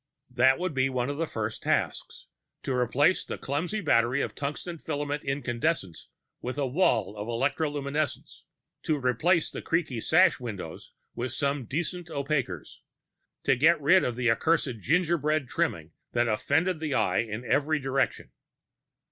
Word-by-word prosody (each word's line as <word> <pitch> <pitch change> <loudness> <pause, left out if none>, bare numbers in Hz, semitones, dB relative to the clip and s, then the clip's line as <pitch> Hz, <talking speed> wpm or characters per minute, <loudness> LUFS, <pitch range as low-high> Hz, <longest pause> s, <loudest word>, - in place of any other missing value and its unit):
That 130 +2 +4
would 180 -2 -2
be 135 0 +2
one 125 +1 -1
of 145 - -6
the 165 0 -1
first 110 -3 -4
tasks - - -1 0.4
to 135 - -1
replace 130 +8 +2
the - - -5
clumsy 170 +10 -2
battery 120 -3 +3
of - - -3
tungsten 150 +4 -5
filament 145 -1 -3
incandescents 135 - -2 0.3
with 125 +3 -4
a 140 - +1
wall 125 - +1
of 105 +1 -5
electroluminescents, 145 +3 -2 0.4
to 155 - 0
replace 150 +7 +2
the - - -6
creaking 160 -9 -1
sash 170 +4 +4
windows 100 -10 -7 0.2
with 120 +1 -4
some 140 -2 -1
decent 170 +6 -3
opaquers, 140 -3 -3 0.6
to 135 - +3
get 155 +6 +4
rid 180 +6 +5
of 120 - -1
the 120 -1 +2
accursed 135 -2 +1
gingerbread 155 - +1
trimming - - -2 0.2
that 120 0 +2
offended 155 +10 +1
the 155 -4 -2
eye - - +2
in 115 +1 -3
every 150 +5 +2
direction. 135 -1 -1
140 Hz, 145 wpm, -28 LUFS, 125-155 Hz, 0.6 s, rid